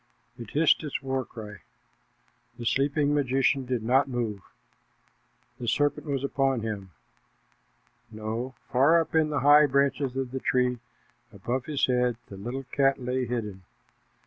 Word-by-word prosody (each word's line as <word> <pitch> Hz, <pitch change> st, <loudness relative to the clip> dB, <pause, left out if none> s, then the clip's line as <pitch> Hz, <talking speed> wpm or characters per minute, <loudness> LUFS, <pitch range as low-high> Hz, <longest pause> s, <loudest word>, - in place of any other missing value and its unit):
It 120 Hz, -3 st, -9 dB
hissed 155 Hz, +2 st, +3 dB
its 150 Hz, -3 st, -4 dB
war 135 Hz, -1 st, -1 dB
cry. 105 Hz, -4 st, -10 dB, 1.0 s
The 120 Hz, -, -7 dB
sleeping 145 Hz, +3 st, +1 dB
magician 135 Hz, -1 st, +1 dB
did 125 Hz, -3 st, -1 dB
not 130 Hz, +4 st, +3 dB
move. 115 Hz, -5 st, -2 dB, 1.2 s
The 120 Hz, -, -5 dB
serpent 145 Hz, +4 st, 0 dB
was 140 Hz, -2 st, -2 dB
upon 135 Hz, -3 st, 0 dB
him 105 Hz, -3 st, -5 dB, 1.2 s
no, 110 Hz, +4 st, -5 dB, 0.2 s
far 140 Hz, +7 st, +5 dB
up 165 Hz, -, -3 dB
in 160 Hz, -1 st, +3 dB
the 150 Hz, -3 st, -1 dB
high 145 Hz, +2 st, +7 dB
branches 140 Hz, -1 st, +1 dB
of 130 Hz, -2 st, -2 dB
the 130 Hz, -, -3 dB
tree 125 Hz, -1 st, +1 dB, 0.5 s
above 125 Hz, +1 st, -3 dB
his 150 Hz, -3 st, +1 dB
head 125 Hz, -2 st, +1 dB
the 100 Hz, -, -8 dB
little 120 Hz, +7 st, -5 dB
cat 135 Hz, -1 st, +2 dB
lay 125 Hz, 0 st, -2 dB
hidden. 105 Hz, -5 st, -4 dB
130 Hz, 145 wpm, -27 LUFS, 120-140 Hz, 1.2 s, high